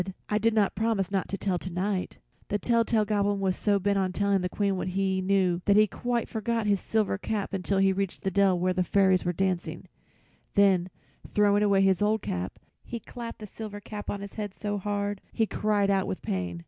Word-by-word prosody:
"I 210 - +2
did 225 +1 +2
not 205 -3 +3
promise 220 -4 0
not 195 -2 0
to 195 - -3
tell 185 -3 -1
to 185 - -6
night." 185 +2 -2 0.3
The 205 - 0
tell 230 +2 +2
tale 220 -2 +1
Goblin 205 -1 +1
was 190 -1 0
so 205 -1 +2
bent 200 +1 +1
on 185 -1 0
telling 200 0 +1
the 180 - -1
Queen 200 0 0
what 185 - -3
he 190 0 0
knew 185 -2 +2
that 200 - +4
he 215 +1 +7
quite 240 +2 -2
forgot 225 0 -2
his 200 -2 +2
new - - -16
silver 215 -3 +1
cap 205 -1 -3
until 195 +1 0
he 195 0 +4
reached 195 -1 -3
the 190 - 0
dell 195 -1 +3
where 185 +1 +1
the 180 0 +1
fairies 190 0 +3
were 175 - +2
dancing; 185 0 -2 0.7
then 190 -3 +4 0.5
throwing 205 0 +4
away 200 -2 +4
his 190 -1 +3
old 215 +1 +2
cap, 90 +1 -4 0.3
he 235 - -6
clapped 230 +1 -8
the 215 - -8
silver 210 0 -7
cap 205 0 -8
on 200 - -3
his 200 0 -8
head 205 -3 -5
so 205 -1 -3
hard 205 0 -2
he 225 - +1
cried 205 -1 +1
out 195 -1 +1
with 185 - -4
pain. 90 -2 -3
200 Hz, 225 wpm, -27 LUFS, 190-210 Hz, 0.7 s, he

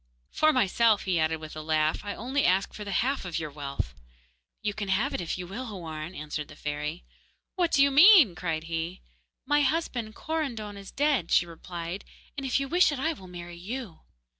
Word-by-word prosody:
'For 310 - +4
myself,' 230 -3 +3
he 180 -3 +1
added, 160 0 +1
with 155 0 -9
a 155 - -5
laugh, 155 0 +1
'I 205 - -4
only 265 +5 -1
ask 190 +2 +2
for 210 - -7
the 200 - -5
half 275 +1 -1
of 180 -3 -3
your 155 -2 -4
wealth.' 140 - -4 0.7
'You 210 -1 0
can 210 -1 -4
have 210 +9 +1
it, - - -2
if 170 - -3
you 180 - -5
will, 225 +8 -6
Houarn,' 170 -4 -6
answered 150 0 -5
the 145 - -13
fairy. 150 +3 -4 0.5
'What 350 -3 +1
do 275 - +5
you 280 - +4
mean?' 310 - +8
cried 165 -3 -3
he. 165 +2 -4 0.4
'My 295 0 +3
husband, 260 -7 -1
Korandon, 245 -10 -3
is 200 -1 -10
dead,' 280 - +1
she 175 - +4
replied, 170 +2 -6 0.3
'and 275 -2 -3
if 260 - +2
you 275 - -2
wish 350 +2 +4
it, 290 - -3
I 320 +5 0
will 190 -11 -12
marry 175 -1 -8
you. 215 +1 -6
195 Hz, 205 wpm, -28 LUFS, 165-265 Hz, 0.7 s, mean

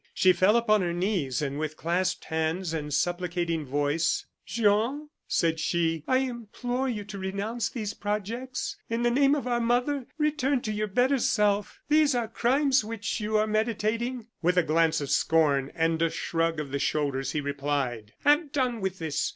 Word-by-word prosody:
She 185 -1 +5
fell 185 +6 +4
upon 215 -3 +3
her 175 -1 -1
knees, 175 - -1
and 140 0 -3
with 155 0 -3
clasped 180 +3 -1
hands 160 +2 -1
and 150 -2 -3
supplicating 175 -1 -1
voice: 145 +4 0 0.2
"Jean," 230 +7 +1 0.2
said 165 -1 +1
she, 165 -2 0
"I 255 - +3
implore 245 +1 -2
you 215 -4 -3
to 200 0 -8
renounce 200 +4 -2
these 215 -4 -4
projects. 220 +5 -3
In 230 +1 -1
the 240 - +3
name 275 +3 +4
of 285 - -3
our 240 -1 0
mother, 245 +3 0
return 290 -4 +1
to 215 - -3
your 215 0 -1
better 255 +7 +2
self. 210 -3 +1
These 300 -2 +4
are 235 -2 0
crimes 260 +3 +2
which 215 0 -3
you 215 0 0
are 215 - +3
meditating!" 225 +2 -1 0.2
With 180 +1 +2
a 180 - +5
glance 160 0 +2
of 140 -1 -3
scorn 140 -2 +2
and 165 -1 +1
a 165 - +3
shrug 165 0 -1
of 145 -3 -5
the 140 - -1
shoulders, 140 -2 -1
he 155 - 0
replied: 140 -6 -2
"Have 295 +1 +4
done 255 -6 0
with 190 -1 -2
this. 160 -4 -1
200 Hz, 175 wpm, -27 LUFS, 160-240 Hz, 0.2 s, She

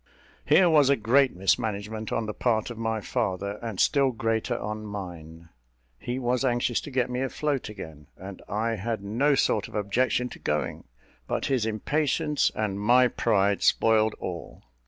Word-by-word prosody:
Here 185 - +6
was 150 -5 +5
a 140 - +5
great 130 +2 +3
mismanagement 105 +2 -1
on 115 - -1
the 105 - -4
part 115 0 0
of 120 - -8
my 110 -1 -1
father, 100 -3 -2
and 115 -5 -5
still 140 -2 +3
greater 115 -1 -1
on 105 +1 -5
mine. 85 -5 -8 0.5
He 125 +1 -4
was 125 0 0
anxious 120 -2 +1
to - - -8
get 130 -2 0
me 125 +1 -3
afloat 135 -1 -2
again, 80 -8 -10
and 95 0 -9
I 110 +2 -1
had 110 +1 -3
no 130 +9 +2
sort 110 -5 +1
of - - -12
objection 120 +5 0
to - - -11
going; 75 0 -2 0.4
but - - -2
his 125 -5 0
impatience 150 +6 0
and 105 -2 -2
my 125 +4 +4
pride 100 -2 +1
spoiled 110 -1 +3
all. 85 -2 -7
110 Hz, 165 wpm, -26 LUFS, 100-125 Hz, 0.5 s, Here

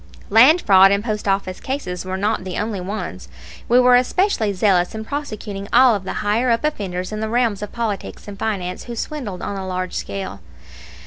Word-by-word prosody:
Land 265 - +6
fraud 195 -1 +7
and 200 +1 +1
post 215 -3 -3
office 195 -1 -1
cases 185 -10 -4
were 185 0 -3
not 210 0 0
the 185 -1 -5
only 210 -2 -2
ones. 200 +4 -5 0.4
We 245 +1 +6
were 250 0 +6
especially 250 - +2
zealous 185 -1 +2
in 220 0 -5
prosecuting 215 -8 -5
all 255 -2 +6
of 200 -3 -3
the - - -3
"higher 225 +5 +2
up" 230 +3 +1
offenders 190 -11 -3
in 215 - -4
the 220 0 -2
realms 230 -4 +1
of 210 - -5
politics 220 -4 -4
and 200 -1 -9
finance 185 -5 -3
who 240 - -6
swindled 225 - -5
on 200 - -4
a 190 -1 -5
large 185 0 -3
scale. 195 - -5
210 Hz, 195 wpm, -20 LUFS, 190-235 Hz, 0.4 s, fraud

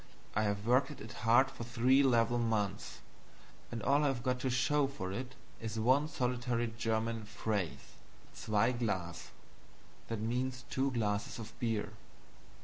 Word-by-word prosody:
I 110 - +3
have 100 0 -1
worked 125 +3 +4
at 150 - -9
it 110 - -8
hard 120 +4 +4
for - - -7
three 120 +3 +4
level 120 -2 +3
months, 110 -4 -1 0.7
and 115 -3 -4
all 140 +3 +3
I - - +4
have 130 -4 -1
got 125 0 0
to 130 - -1
show 135 +4 +2
for 95 -9 -5
it 125 +5 -5 0.3
is 110 -1 -4
one 130 +6 +4
solitary 125 -4 -1
German 115 0 -1
phrase 105 -3 -3 0.4
'ZWEI 115 +3 +1
GLAS'" 95 -7 -2 1.4
(two 135 +1 +1
glasses 105 -3 -1
of 110 -1 -8
beer). 110 -3 -1
115 Hz, 145 wpm, -34 LUFS, 110-130 Hz, 1.4 s, worked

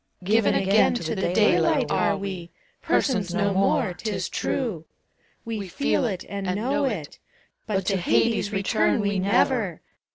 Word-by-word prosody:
Given 210 +2 +2
again 195 +4 +3
to 235 - -3
the 190 -4 -1
daylight 180 -4 +2
are 205 -1 +1
we, 190 -3 -6 0.3
Persons 195 -9 0
no 200 -2 +1
more, 195 +2 +1
't 215 +5 -5
is 190 -3 -3
true, 215 - -3 0.3
— - - -40
We 220 -4 -4
feel 275 +5 0
it 190 -6 -3
and 200 -1 -5
know 275 +7 0
it, 195 - -4 0.2
— - - -42
But 195 -3 -1
to 195 0 +1
Hades 210 +3 +1
return 215 +3 +1
we 200 -2 0
never 200 - +1
200 Hz, 160 wpm, -24 LUFS, 190-225 Hz, 0.3 s, again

